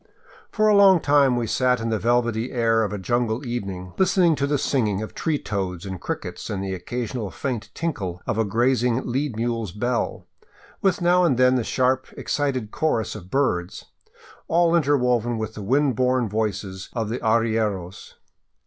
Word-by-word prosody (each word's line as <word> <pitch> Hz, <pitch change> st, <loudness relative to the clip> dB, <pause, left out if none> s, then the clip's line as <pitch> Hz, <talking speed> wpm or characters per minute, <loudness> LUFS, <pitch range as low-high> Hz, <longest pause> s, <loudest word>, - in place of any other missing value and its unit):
For 215 Hz, 0 st, +1 dB
a 210 Hz, -, +5 dB
long 195 Hz, -3 st, +7 dB
time 140 Hz, -4 st, +3 dB
we 120 Hz, -1 st, -1 dB
sat 125 Hz, +2 st, +1 dB
in 115 Hz, 0 st, -2 dB
the 110 Hz, -1 st, 0 dB
velvety 120 Hz, 0 st, 0 dB
air 115 Hz, -3 st, +2 dB
of 100 Hz, -, -2 dB
a 105 Hz, -, -3 dB
jungle 120 Hz, +5 st, -1 dB
evening, 95 Hz, -7 st, -5 dB
listening 185 Hz, -3 st, +4 dB
to 140 Hz, -, 0 dB
the 145 Hz, 0 st, +1 dB
singing 110 Hz, -7 st, 0 dB
of 110 Hz, -, -8 dB
tree 160 Hz, -3 st, -1 dB
toads 95 Hz, -6 st, -4 dB
and 95 Hz, -3 st, -6 dB
crickets -, -, -5 dB
and 95 Hz, -2 st, -3 dB
the 95 Hz, -1 st, -3 dB
occasional 110 Hz, +3 st, -4 dB
faint 115 Hz, +1 st, -4 dB
tinkle 95 Hz, -, -3 dB
of 115 Hz, -1 st, -1 dB
a -, -, +4 dB
grazing 120 Hz, +3 st, +1 dB
lead 130 Hz, 0 st, -2 dB
mule's 115 Hz, -3 st, -2 dB
bell, 120 Hz, +5 st, -2 dB, 0.6 s
with 190 Hz, -1 st, +1 dB
now 180 Hz, +1 st, +4 dB
and 145 Hz, -8 st, +2 dB
then 130 Hz, 0 st, +5 dB
the 125 Hz, -2 st, +1 dB
sharp, 130 Hz, +2 st, +1 dB
excited 130 Hz, -7 st, -2 dB
chorus 155 Hz, -8 st, 0 dB
of 95 Hz, -4 st, -10 dB
birds, 90 Hz, -10 st, -1 dB, 0.3 s
— -, -, -23 dB
all 170 Hz, 0 st, +3 dB
interwoven 125 Hz, -6 st, +2 dB
with 110 Hz, 0 st, -4 dB
the 105 Hz, -, -8 dB
wind 135 Hz, +5 st, +2 dB
borne 125 Hz, 0 st, +1 dB
voices 100 Hz, -3 st, -3 dB
of 115 Hz, -3 st, -2 dB
the 120 Hz, -, -3 dB
arrieros. 110 Hz, -5 st, -1 dB
120 Hz, 175 wpm, -23 LUFS, 105-135 Hz, 0.6 s, long